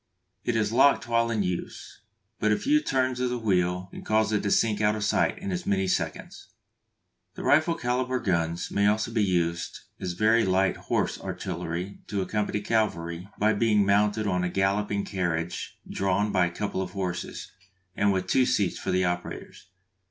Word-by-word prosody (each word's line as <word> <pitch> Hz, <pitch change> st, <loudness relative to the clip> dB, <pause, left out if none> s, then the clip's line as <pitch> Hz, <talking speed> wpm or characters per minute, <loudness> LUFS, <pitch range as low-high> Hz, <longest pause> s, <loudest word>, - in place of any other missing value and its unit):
It 120 Hz, -, -1 dB
is 110 Hz, -2 st, +1 dB
locked 135 Hz, +2 st, +4 dB
while 115 Hz, 0 st, +2 dB
in 110 Hz, -3 st, 0 dB
use, 90 Hz, -2 st, -5 dB, 0.4 s
but 105 Hz, -, +2 dB
a 105 Hz, -, +3 dB
few 300 Hz, +3 st, +2 dB
turns 130 Hz, -, 0 dB
of 125 Hz, 0 st, 0 dB
the 125 Hz, -, -2 dB
wheel 90 Hz, -4 st, 0 dB
cause 110 Hz, 0 st, +2 dB
it 105 Hz, -, +2 dB
to 100 Hz, -, -1 dB
sink 105 Hz, 0 st, +2 dB
out 105 Hz, 0 st, +3 dB
of 105 Hz, -, -3 dB
sight 105 Hz, -, +1 dB
in 200 Hz, 0 st, -5 dB
as 180 Hz, -1 st, -4 dB
many 95 Hz, -1 st, +1 dB
seconds. 95 Hz, -, -3 dB, 0.9 s
The -, -, -7 dB
rifle 155 Hz, +3 st, +3 dB
calibre 125 Hz, -2 st, -1 dB
guns 85 Hz, -2 st, -1 dB
may 100 Hz, 0 st, +2 dB
also 110 Hz, +2 st, +1 dB
be 115 Hz, -2 st, +1 dB
used 85 Hz, -3 st, -1 dB, 0.2 s
as 90 Hz, -1 st, -3 dB
very 110 Hz, +5 st, +3 dB
light 95 Hz, 0 st, +2 dB
horse -, -, -2 dB
artillery 90 Hz, +4 st, -4 dB
to 100 Hz, -, -2 dB
accompany 105 Hz, +2 st, -1 dB
cavalry 90 Hz, -5 st, -1 dB
by 110 Hz, +1 st, +3 dB
being 105 Hz, -1 st, +3 dB
mounted 105 Hz, +2 st, +2 dB
on 90 Hz, -3 st, 0 dB
a 90 Hz, -, 0 dB
"galloping 100 Hz, +2 st, 0 dB
carriage" 85 Hz, -3 st, -3 dB
drawn 100 Hz, +2 st, 0 dB
by 90 Hz, -3 st, +3 dB
a -, -, -4 dB
couple 95 Hz, +2 st, -3 dB
of 90 Hz, -1 st, -5 dB
horses, 90 Hz, -3 st, -4 dB, 0.4 s
and 100 Hz, 0 st, +3 dB
with 95 Hz, -1 st, 0 dB
two 130 Hz, -1 st, +3 dB
seats 100 Hz, -4 st, +1 dB
for -, -, -4 dB
the 95 Hz, 0 st, +2 dB
operators. 90 Hz, 0 st, -5 dB
100 Hz, 180 wpm, -27 LUFS, 90-110 Hz, 0.9 s, locked